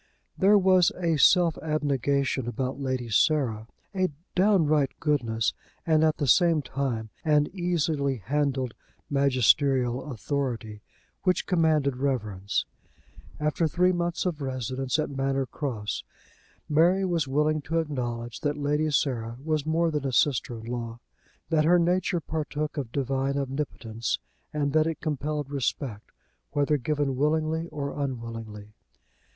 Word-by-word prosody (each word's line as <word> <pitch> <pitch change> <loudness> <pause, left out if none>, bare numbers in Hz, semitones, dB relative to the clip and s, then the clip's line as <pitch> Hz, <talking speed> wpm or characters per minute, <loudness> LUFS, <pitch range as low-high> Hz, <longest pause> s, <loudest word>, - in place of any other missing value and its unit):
There 205 +2 +5
was 185 -2 +5
a 170 -3 +1
self 170 +2 +5
abnegation 140 -4 0
about 130 +2 -3
Lady 130 -3 -2
Sarah, 115 -3 +2 0.3
a 185 -1 +1 0.2
downright 160 -8 +3
goodness, 115 -7 0 0.3
and 160 -1 +3
at 155 -1 +3
the 145 - -1
same 165 +2 +4
time 120 -4 -3
an 150 -2 +4
easily 160 -6 0
handled 130 +2 -1 0.4
magisterial 135 -1 +2
authority, 120 -5 -3 0.4
which 185 -1 +1
commanded 155 -7 +2
reverence. 110 -8 -1 0.7
After 150 +2 +1
three 180 +4 +3
months 175 0 -1
of 165 -5 -2
residence 130 0 -2
at 155 -2 -1
Manor 135 0 0
Cross, 115 - -4 0.6
Mary 175 +6 +3
was 170 -6 0
willing 150 +3 +1
to 165 +3 -2
acknowledge 120 -7 -3
that 145 0 -1
Lady 150 +2 0
Sarah 120 -5 -1
was 155 -1 -1
more 165 +1 +2
than 150 -3 -1
a - - -1
sister 125 -2 +1
in 110 - -10
law, 115 -1 -5 0.5
that 155 -1 +4
her 175 +3 +5
nature 175 +1 +1
partook 155 -1 -3
of 135 -7 -4
divine 135 +1 -1
omnipotence, 130 -5 -3 0.3
and 145 -2 -1
that 155 0 +4
it 165 - -3
compelled 150 -1 -3
respect, 130 -5 -3 0.4
whether 145 +1 +2
given 145 0 -1
willingly 155 +3 0
or 145 -3 -4
unwillingly. 115 -6 -5
145 Hz, 130 wpm, -27 LUFS, 130-155 Hz, 0.7 s, There